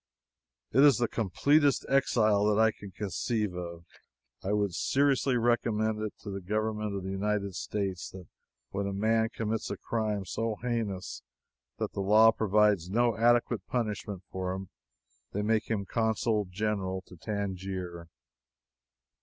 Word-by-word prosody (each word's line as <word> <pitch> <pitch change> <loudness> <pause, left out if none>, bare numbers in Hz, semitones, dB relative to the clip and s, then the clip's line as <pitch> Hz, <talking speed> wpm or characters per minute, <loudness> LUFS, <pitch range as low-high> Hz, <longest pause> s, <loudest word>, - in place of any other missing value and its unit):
It 130 - +2
is 145 -2 +7
the 120 -1 +1
completest 140 - +2
exile 110 -6 +3
that 105 0 +3
I 110 0 +5
can 100 -2 -11
conceive 105 +1 -2
of. 85 -1 -7 0.6
I 95 - -1
would 105 -3 +1
seriously 135 +2 +2
recommend 110 -2 +1 0.2
to 105 - -6
the 100 0 -5
government 105 +1 -2
of 95 - -4
the 95 - -4
United 100 0 -1
States 95 -1 -3
that 95 -2 -10 0.5
when 100 0 -2
a 100 - -3
man 110 +3 +2
commits 110 -1 -3
a - - -4
crime 105 -3 -2
so 115 +3 -2
heinous 110 -5 -3 0.6
that - - -2
the 100 - -3
law 110 +3 +6
provides 105 -4 +2
no 120 +3 +2
adequate 120 0 +2
punishment 105 -5 -3
for 95 0 -2
it, 95 0 -6 0.7
they 105 - -1
make 110 +1 +1
him 105 -3 -1
Consul 110 -1 0
General 95 -1 -2
to - - -14
Tangier. 95 -3 -4
105 Hz, 145 wpm, -29 LUFS, 95-115 Hz, 0.7 s, is